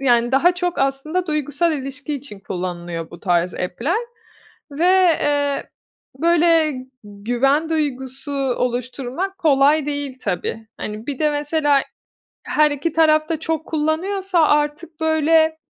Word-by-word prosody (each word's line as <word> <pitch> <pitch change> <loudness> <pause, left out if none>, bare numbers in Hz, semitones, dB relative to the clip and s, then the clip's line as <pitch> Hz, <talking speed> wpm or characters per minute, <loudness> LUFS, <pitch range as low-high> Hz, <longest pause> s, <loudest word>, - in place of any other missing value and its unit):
yani, 240 -2 +2
daha 345 +7 +4
çok 355 -1 -2
aslında 290 +7 -1
duygusal 305 +2 0
ilişki 285 +1 -4
için 255 -8 -8
kullanılıyor 175 -3 -5
bu 170 - -12
tarz 175 -1 +1
app'ler 280 - -2 0.7
ve, 325 +6 +1 0.3
eee, 285 -1 0 0.5
böyle 330 -1 +3 0.3
güven 245 +10 0
duygusu 275 -2 -3
oluşturmak 255 +6 -2
kolay 290 0 +3
değil 285 -3 -4
tabii. 215 +3 -3
Hani, 215 +2 -6
bir 280 -3 -4
de 305 -1 +2
mesela 290 -1 +1 0.6
her 300 0 +3
iki 290 +3 -2
taraf 310 -1 +3
da 320 - -1
çok 320 0 -2
kullanıyorsa 350 +5 -1
artık, 300 +1 +1
böyle 315 0 +3
290 Hz, 120 wpm, -20 LUFS, 255-320 Hz, 0.7 s, daha